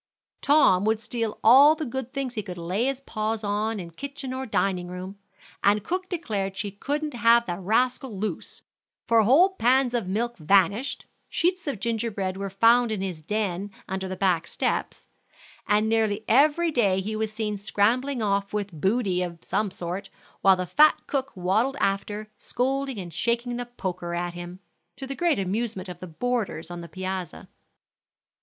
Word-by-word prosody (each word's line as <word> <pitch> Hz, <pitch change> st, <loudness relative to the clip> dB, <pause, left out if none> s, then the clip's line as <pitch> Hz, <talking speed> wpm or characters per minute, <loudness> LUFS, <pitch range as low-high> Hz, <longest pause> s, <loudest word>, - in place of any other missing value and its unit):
Tom 280 Hz, -11 st, +5 dB
would 220 Hz, 0 st, +2 dB
steal 225 Hz, 0 st, -3 dB
all 275 Hz, +7 st, +8 dB
the 310 Hz, -, -4 dB
good 260 Hz, 0 st, -4 dB
things 270 Hz, -3 st, -3 dB
he 220 Hz, -, -2 dB
could 185 Hz, -3 st, -8 dB
lay 180 Hz, +7 st, -1 dB
his 270 Hz, 0 st, -1 dB
paws 215 Hz, -3 st, -3 dB
on 210 Hz, +1 st, -1 dB
in 170 Hz, -2 st, -7 dB
kitchen 275 Hz, -, -6 dB
or 260 Hz, 0 st, -4 dB
dining 185 Hz, -4 st, 0 dB
room, 185 Hz, +2 st, -7 dB, 0.4 s
and 205 Hz, +1 st, +3 dB
cook 370 Hz, +1 st, -3 dB
declared 205 Hz, -, -3 dB
she 200 Hz, +1 st, -3 dB
couldn't 290 Hz, +8 st, -3 dB
have 235 Hz, 0 st, +4 dB
the 175 Hz, -2 st, -4 dB
rascal 245 Hz, +3 st, 0 dB
loose; 215 Hz, +2 st, -5 dB, 0.4 s
for 230 Hz, -1 st, +5 dB
whole 275 Hz, -, +6 dB
pans 250 Hz, +1 st, +3 dB
of 230 Hz, -6 st, -1 dB
milk 235 Hz, +5 st, -2 dB
vanished, 200 Hz, -, +2 dB, 0.2 s
sheets 360 Hz, 0 st, 0 dB
of 275 Hz, -8 st, -2 dB
ginger 230 Hz, +1 st, -1 dB
bread 190 Hz, -3 st, -3 dB
were 195 Hz, 0 st, -4 dB
found 230 Hz, +4 st, +4 dB
in 210 Hz, -3 st, -2 dB
his 180 Hz, -5 st, -4 dB
den 200 Hz, +1 st, -2 dB, 0.2 s
under 190 Hz, 0 st, -3 dB
the 185 Hz, -, -4 dB
back 180 Hz, -3 st, +1 dB
steps, -, -, -2 dB, 0.6 s
and 210 Hz, +1 st, +3 dB
nearly 220 Hz, -1 st, +1 dB
every 305 Hz, +7 st, +4 dB
day 200 Hz, -9 st, +2 dB
he 215 Hz, +3 st, -3 dB
was 215 Hz, 0 st, -2 dB
seen 215 Hz, -1 st, -2 dB
scrambling 225 Hz, +5 st, +1 dB
off 200 Hz, -1 st, 0 dB
with 205 Hz, -3 st, -2 dB
booty 195 Hz, -2 st, +1 dB
of 175 Hz, -2 st, -4 dB
some 210 Hz, -1 st, 0 dB
sort, 185 Hz, +1 st, -5 dB, 0.3 s
while 195 Hz, -1 st, +6 dB
the 185 Hz, 0 st, -3 dB
fat 305 Hz, -, +5 dB
cook 275 Hz, -1 st, -2 dB
waddled 210 Hz, +10 st, +1 dB
after, 205 Hz, +2 st, -1 dB
scolding 270 Hz, 0 st, -1 dB
and 175 Hz, -4 st, -7 dB
shaking 235 Hz, +6 st, -1 dB
the 245 Hz, 0 st, -4 dB
poker 180 Hz, -7 st, -4 dB
at 175 Hz, 0 st, -2 dB
him, 175 Hz, +1 st, -8 dB, 0.3 s
to 270 Hz, -, -7 dB
the 270 Hz, -, -4 dB
great 340 Hz, -1 st, +1 dB
amusement 195 Hz, 0 st, -2 dB
of 180 Hz, -, -8 dB
the 185 Hz, -, -7 dB
boarders 190 Hz, -2 st, -2 dB
on 175 Hz, 0 st, -6 dB
the 170 Hz, -, -9 dB
piazza. 185 Hz, -1 st, -5 dB
215 Hz, 175 wpm, -26 LUFS, 190-245 Hz, 0.6 s, all